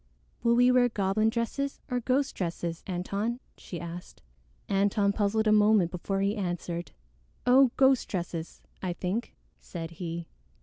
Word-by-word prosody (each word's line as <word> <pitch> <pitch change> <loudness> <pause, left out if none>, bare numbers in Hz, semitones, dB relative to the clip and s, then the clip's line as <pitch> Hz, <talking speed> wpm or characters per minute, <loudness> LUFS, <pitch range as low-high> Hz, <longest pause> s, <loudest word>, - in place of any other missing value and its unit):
"Will 235 0 +3
we 245 +1 +5
wear 250 -1 +4
goblin 215 0 +1
dresses 240 +5 -2
or 250 - +1
ghost 265 +3 +1
dresses, 170 -1 -3
Antone?" 200 +6 -2 0.2
she 175 - -8
asked. 170 +1 -8 0.4
Antone 200 +1 +2
puzzled 215 +1 +1
a 215 - +4
moment 210 -4 +4
before 195 +2 -2
he 200 +2 +1
answered. 175 -4 -3 0.5
"Oh, 260 +1 +6
ghost 265 -1 +4
dresses, 170 -3 -5 0.2
I 180 -2 -2
think," 195 +7 -3 0.2
said 165 - -7
he. 170 0 -5
200 Hz, 140 wpm, -28 LUFS, 175-235 Hz, 0.5 s, Oh